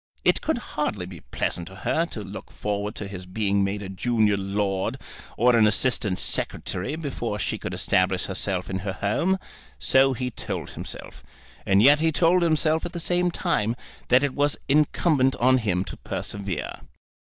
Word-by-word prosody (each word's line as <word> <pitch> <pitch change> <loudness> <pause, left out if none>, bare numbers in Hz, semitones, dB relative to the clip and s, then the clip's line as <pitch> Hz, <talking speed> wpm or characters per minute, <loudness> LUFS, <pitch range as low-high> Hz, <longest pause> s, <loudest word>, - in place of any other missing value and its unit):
It - - +4
could 320 - 0
hardly 150 - -3
be 90 -2 -9
pleasant 85 +2 -3
to 95 - -11
her 160 - 0
to 110 -10 -6
look 100 +2 -8
forward 105 0 -3
to 100 - -4
his 95 -2 -8
being 100 +1 +1
made 100 +1 -2
a 95 - -6
junior 110 +1 +2
lord 100 0 -1 0.4
or 120 +1 +5
an 110 -2 +6
assistant 105 -3 +1
secretary 100 +12 -2
before 130 -9 -3
she - - -2
could - - -5
establish 95 0 +1
herself 95 -2 -1
in 95 0 -3
her 95 0 -3
home. 135 - +1 0.4
So 135 - +4
he 125 +1 -3
told - - -5
himself. - - -6 0.5
And 100 +2 +5
yet 145 +3 +7
he 160 +1 +2
told 170 +3 +3
himself 160 -1 +2
at 175 - -5
the 170 - -3
same 175 +1 +1
time 150 - 0 0.3
that 125 +2 +5
it 140 -2 0
was 145 0 +1
incumbent 145 -1 +3
on 130 +1 +4
him 95 -5 0
to - - -8
persevere. 100 -5 -4
110 Hz, 175 wpm, -25 LUFS, 95-145 Hz, 0.5 s, yet